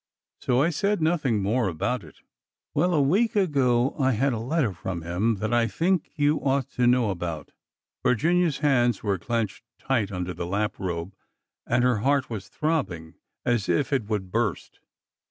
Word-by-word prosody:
So 125 +2 +2
I 165 - +2
said 200 +5 0
nothing 150 - +1
more 115 +3 +1
about 95 +7 -2
it. 75 - -16 0.5
Well, 175 +4 +2
a - - +3
week 205 +12 +2
ago 135 - +2
I 130 -1 +3
had 130 +4 +1
a 115 - -2
letter 130 - 0
from 85 0 -5
him 95 +7 0
that 110 +4 -2
I 120 -1 +3
think 175 +6 0
you 150 0 +2
ought 135 -2 0
to 125 -1 +1
know 120 -3 +3
about.'' 85 -4 -5 0.5
Virginia's 165 +5 +2
hands 120 -6 +2
were 100 -3 0
clenched 115 +1 -2
tight 115 -7 -1
Under 90 -1 -3
the 85 - -5
lap 105 +3 -1
robe, 90 0 -4 0.5
and 120 +1 +2
her 125 -3 +3
heart 135 +4 +1
was 100 -3 -5
throbbing 110 - -2 0.3
as 120 -4 0
if 145 -1 +1
it 130 -6 +1
would 100 -4 -3
burst. 115 -3 -2
120 Hz, 170 wpm, -25 LUFS, 100-145 Hz, 0.5 s, a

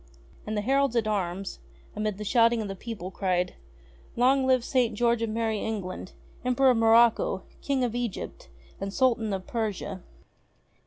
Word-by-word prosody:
And 215 0 -2
the - - +1
Heralds 270 +2 +2
at 225 -2 +1
arms, 195 -2 -2 0.4
amid 210 -1 -2
the 210 - -5
shouting 230 +2 +3
of 215 - -3
the 195 - -5
people, 195 -3 -6
cried: 180 -2 0 0.6
"Long 260 +2 +3
live 255 -2 +3
St. 245 -4 +1
George 235 +1 +2
of 230 - 0
Merrie 220 -1 -1
England, 190 -4 -4 0.3
Emperor 255 +1 +4
of 245 - +1
Morocco, 225 +1 +4 0.2
King 275 -2 0
of 240 -3 -1
Egypt, 245 - -5 0.3
and 195 0 -3
Sultan 230 -2 +2
of 190 -1 -3
Persia 205 -4 -3
225 Hz, 160 wpm, -27 LUFS, 200-245 Hz, 0.6 s, Emperor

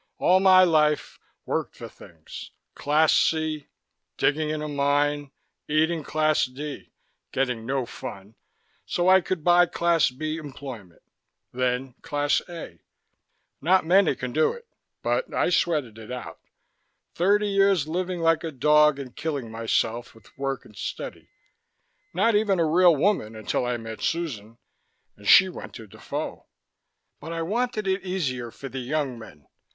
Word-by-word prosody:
All 185 +1 +4
my 185 -1 +7
life, 155 -3 +2 0.3
worked - - -2
for - - -8
things. - - -12 0.2
Class 150 +2 +2
C, 155 -2 +1 0.5
digging 155 +1 +1
in 155 0 -3
a - - -3
mine, 145 0 0 0.4
eating 160 +2 +1
Class 155 +1 +1
D, 140 +3 -8 0.4
getting 125 -4 -1
no 135 -1 -1
fun, 100 -2 -9 0.5
so 175 0 -1
I 190 0 +7
could 180 -3 -3
buy 175 +1 +5
Class 170 -3 +2
B 155 +5 -4
employment. 130 - -9 0.5
Then 125 +1 -1
Class 145 -1 0
A. 165 - -9 0.8
Not 180 +4 +3
many 180 -3 +4
can 125 -1 -5
do 155 +1 +2
it, 475 -1 -12 0.4
but - - -1
I - - +2
sweated 145 -11 0
it 110 +2 -10
out. 125 0 -7 0.7
Thirty 205 +4 +2
years 195 -6 +3
living 180 +1 -2
like 165 0 +2
a 165 - -2
dog 150 +2 +4
and 130 -3 -8
killing 145 -7 -4
myself 115 +1 -1
with 110 -3 -20
work 135 0 -3
and - - -17
study. - - -6 0.8
Not 230 - +2
even 205 -3 +2
a 165 - +3
real 170 +1 +5
woman 145 - 0
until 110 +3 -2
I 120 0 -1
met 110 -1 -8
Susan, 115 -10 -3 0.6
and 100 0 -12
she 190 - +8
went 185 - -9
to 115 - -9
Defoe. 100 - -6 0.7
But 160 - -8
I 165 0 -2
wanted 220 +2 -1
it 190 +1 0
easier 140 -11 -2
for 135 - -9
the 135 0 -6
young 130 -1 -2
men. 75 - -13
150 Hz, 150 wpm, -25 LUFS, 125-175 Hz, 0.8 s, she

